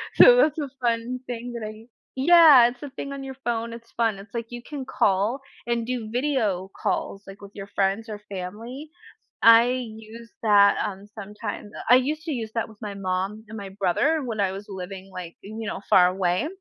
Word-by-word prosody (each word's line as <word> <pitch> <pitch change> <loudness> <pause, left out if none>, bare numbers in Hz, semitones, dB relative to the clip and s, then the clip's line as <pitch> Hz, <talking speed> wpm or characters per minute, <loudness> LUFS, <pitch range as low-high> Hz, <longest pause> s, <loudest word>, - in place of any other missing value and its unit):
So - - +9
that's 320 - +3
a 290 -2 -3
fun 235 +1 -1
thing 245 0 -5
that 235 -2 -5
I - - -6
u 220 +2 -15 0.3
Yeah, 300 -3 +8
it's 245 +3 -12
a 290 - -6
thing 275 +1 -6
on 275 -1 -6
your 265 0 -7
phone. 230 -1 -2
It's 230 0 -12
fun, 225 -3 0
it's 200 +1 -13
like, 235 -1 -4
you 240 0 -8
can 285 -3 -6
call 210 +1 +1 0.3
and 235 -1 0
do 240 -3 -4
video 230 -8 -1
calls, 195 - -2
like, 195 +1 -11
with 200 0 -11
your 195 -1 -8
friends 200 +4 0
or 210 -1 -6
family. 225 +11 -7 0.5
I 230 +1 +8 0.3
use 225 +1 -12
that, 205 -2 +5
um, 200 -2 -5
sometimes. 210 0 -7 0.2
I - - +10
used 300 +4 -2
to 320 - -3
use 230 -5 -3
that 230 - -1
with 220 -2 -17
my 205 -2 -5
mom 195 +2 -3
and 220 - -9
my 200 -2 -7
brother 200 - +1
when 225 -3 -4
I 195 -2 +1
was 195 +2 -7
living 190 0 -8
like, 175 -2 -7
you 220 +2 -7
know, - - -4
far 180 -1 +7
away. 180 +6 0
225 Hz, 205 wpm, -25 LUFS, 200-245 Hz, 0.5 s, I